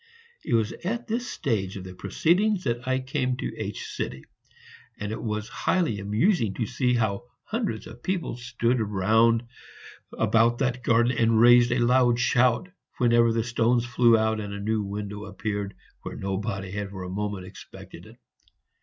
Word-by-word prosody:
It - - +1
was 110 -1 +1
at 230 +6 -2
this 240 +2 -2
stage 100 -9 -2
of 95 - -7
the 90 0 -9
proceedings 185 - +1
that 120 -1 -2
I 130 0 +2
came 130 -1 -1
to - - -4
H; - - -5 1.0
and 105 0 -4
it 110 - -4
was 110 -1 -3
highly 165 - 0
amusing 105 - +1
to 115 - -1
see 125 +2 0
how 110 -1 -1 0.2
hundreds 220 - -3
of 120 +2 -12
people 185 -6 -2
stood 120 0 -1
round 110 +3 +3 0.7
about 115 +1 +3
the 130 -1 +1
garden 120 +2 +3
and 115 -1 +3
raised 120 +1 +6
a 120 - +2
loud 120 0 +3
shout 125 +6 +2 0.3
whenever 120 -1 +4
the 115 0 0
stones 120 0 +1
flew 120 -1 +4
out 110 0 +1
and 100 -1 -5
a - - -6
new 110 +1 0
window 105 +1 -5
appeared 100 0 -4 0.3
where - - -7
nobody 95 0 -3
had 100 0 -4
for 95 -2 -7
a - - -6
moment 100 -1 -3
expected 95 0 -12
it. - - -16
115 Hz, 165 wpm, -26 LUFS, 105-125 Hz, 1.0 s, raised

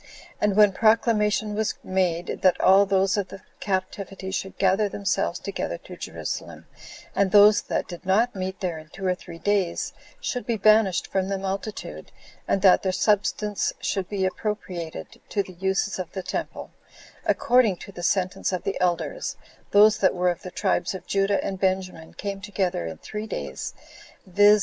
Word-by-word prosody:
And 205 -2 +2
when 210 -1 +6
proclamation 215 0 +2
was 220 +1 -1
made, 180 -2 -1
that 185 -1 +4
all 195 +2 +6
those 195 +1 +2
of 200 -2 -1
the 195 0 -11 0.2
captivity 190 0 -3
should 190 0 -4
gather 195 +2 +2
themselves 200 0 -1
together - - -4
to - - -11
Jerusalem, - - -6 0.5
and 200 -1 +3
those 205 +2 +7
that - - -2
did 175 -1 -9
not 210 +6 +2
meet 190 0 -4
there 175 -4 -2
in 155 - -13
two 195 +3 -7
or 185 - +3
three 175 -2 -10
days 195 -1 0 0.3
should 250 - -3
be 230 -2 0
banished 215 -3 +4
from 190 -1 -1
the 195 - -1
multitude, 195 +2 -5 0.4
and 195 - +1
that 190 -2 +7
their 190 - 0
substance 210 +1 +1
should 195 -3 -2
b 195 -2 0
appropriated 185 -4 -4
to 200 - 0
the 185 - -12
uses 190 +2 -1
of 180 - -5
the 190 - -4
temple, - - -5 0.6
according 245 -6 +3
to 200 - -10
the 175 - -9
sentence 185 +2 0
of 185 - -3
the 195 - -3
elders, 180 - -1 0.3
those 210 +1 +6
that 190 - +3
were 180 0 +2
of 175 - -7
the 185 - -7
tribes 190 +1 0
of 190 - -8
Judah 195 0 +1
and 190 -1 -3
Benjamin 185 -4 -2
came 200 -1 -5
together 190 - -2
in 80 -1 -6
three 215 - -6
days, - - -5 0.5
viz. 205 +3 +5
195 Hz, 175 wpm, -25 LUFS, 185-205 Hz, 0.6 s, those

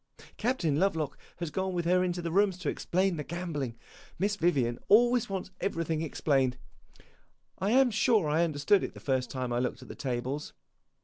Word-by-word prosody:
Captain 190 - 0
Lovelock 160 -8 0 0.2
has 170 -3 -4
gone 190 +2 -2
with 175 -1 -1
her 180 +1 +3
into 175 -1 -2
the 170 - -2
rooms 195 0 +3
to 180 -5 -2
explain 185 0 0
the 150 - -3
gambling 150 -8 -4 0.4
Miss 205 +2 +1
Vivian 140 -10 +1
always 240 +2 +5
wants 190 -1 -4
everything 165 -4 -1
explained. 135 -5 +1 1.0
I 195 - 0
am 255 +2 +5
sure 220 -4 +3
I 155 +3 +2
understood 160 +5 +2
it - - -5
the - - -9
first 130 -3 -1
time 130 -2 -3
I 120 - +1
looked 125 - -2
at - - -14
the - - -6
tables. 130 +2 -3
170 Hz, 180 wpm, -30 LUFS, 145-195 Hz, 1.0 s, always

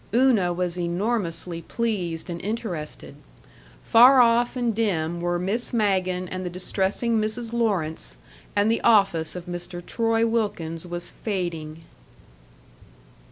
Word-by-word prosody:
Una 235 -8 +4
was 180 0 -2
enormously 175 -2 -2
pleased 190 -8 -3
and 170 - -5
interested. 195 -8 -5 0.7
Far 250 +3 +7
off 240 +1 +4
and 240 -2 0
dim 175 -6 -1
were 175 0 0
Miss 200 +9 -1
Magen 185 -4 +1
and 185 +1 -5
the 180 - -3
distressing 195 +5 0
Mrs. 225 +2 -2
Lawrence; 160 - -1 0.4
and 205 +2 +3
the 230 - 0
office 195 -9 +3
of 180 -1 -6
Mr. 175 0 -6
Troy 225 0 +1
Wilkins 180 -8 -2
was 175 0 -5
fading. 165 -6 -4
185 Hz, 120 wpm, -24 LUFS, 175-225 Hz, 0.7 s, Far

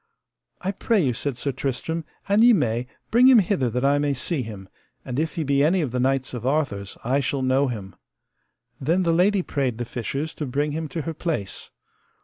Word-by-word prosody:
I 190 - -1
pray 220 +2 +1
you, 135 -8 +2
said 130 +1 -3
Sir 140 - -2
Tristram, 155 +5 -3 0.2
an 200 +2 +4
ye 240 +1 +8
may, 125 - 0 0.2
bring 245 +3 +6
him 260 -2 +8
hither 185 - +2
that 125 +3 -1
I 140 +1 +4
may 145 -1 +1
see 140 +3 -1
him, 105 -5 -8 0.4
and 125 +2 -3
if 160 +2 -1
he 165 - -1
be 140 -1 +2
any 175 +5 +3
of 140 -6 -2
the 125 - -1
knights 130 +1 0
of 120 -3 -5
Arthur's 130 -8 -1
I 130 +4 +1
shall 135 0 -1
know 130 +2 +3
him. 105 -6 -6 0.8
Then 170 +7 +1
the 170 -1 +2
lady 190 +3 +3
prayed 135 -8 -1
the 120 - -3
fishers 135 +7 -4
to 150 - -1
bring 145 +4 0
him 160 +1 -3
to 150 +2 -4
her 165 - -3
place. 155 - -3
140 Hz, 210 wpm, -24 LUFS, 125-165 Hz, 0.8 s, ye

